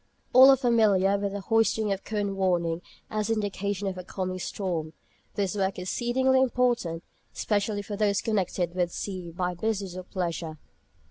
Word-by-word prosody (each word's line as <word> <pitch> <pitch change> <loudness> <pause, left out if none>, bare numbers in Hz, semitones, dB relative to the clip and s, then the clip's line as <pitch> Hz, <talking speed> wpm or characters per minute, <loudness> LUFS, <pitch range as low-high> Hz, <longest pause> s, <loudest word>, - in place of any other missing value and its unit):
All 260 +2 +9
are 270 - +7
familiar 215 -6 +3
with 200 -1 -2
the 200 - -4
hoisting 220 0 +2
of 195 0 -2
cone 205 -2 -2
warning 175 -3 0 0.3
as 215 0 -1
indication 205 -2 -1
of 185 -1 -3
a - - -6
coming 185 0 -4
storm. 170 -5 -3 0.4
This 200 -2 -1
work 195 -1 0
is 180 - -4
exceedingly 260 +2 +2
important, 240 -10 +1 0.3
especially 205 -1 -1
for 205 +1 -5
those 200 -1 +2
connected 185 -5 -1
with 180 -1 0
the - - -10
sea 185 -4 -5
by 180 +2 -2
business 195 -1 -2
or 185 - -5
pleasure. 170 -3 -4
200 Hz, 165 wpm, -27 LUFS, 180-215 Hz, 0.4 s, All